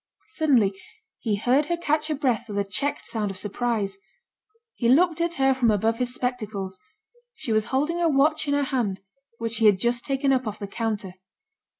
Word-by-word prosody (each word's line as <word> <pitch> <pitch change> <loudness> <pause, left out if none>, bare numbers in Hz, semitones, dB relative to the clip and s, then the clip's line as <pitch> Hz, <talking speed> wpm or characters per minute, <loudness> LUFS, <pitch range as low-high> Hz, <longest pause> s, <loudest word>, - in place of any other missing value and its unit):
Suddenly 255 - +3 0.5
he 215 -3 0
heard 255 +8 +2
her 345 - 0
catch 310 -2 0
her 310 - -1
breath 245 -5 -1
with 205 - -4
a 200 - +2
checked 270 +9 -2
sound 215 -3 -2
of 195 - -6
surprise. 205 -1 -2 0.8
He 235 - 0
looked 330 +4 +4
at 340 0 0
her 270 0 +3
from 255 -3 +2
above 220 +2 +1
his 250 -1 +1
spectacles; 215 -7 -2 0.6
she 225 - -3
was 215 0 +2
holding 300 +6 0
a 335 - +3
watch 305 +2 +2
in 285 - +2
her 285 - +2
hand 235 -8 -1 0.4
which 230 -1 -3
she 230 -1 +4
had 205 -2 +5
just 240 +4 0
taken 275 0 0
up 255 -3 0
off 210 - -4
the 200 - -5
counter. 205 -2 -3
245 Hz, 195 wpm, -25 LUFS, 210-285 Hz, 0.8 s, had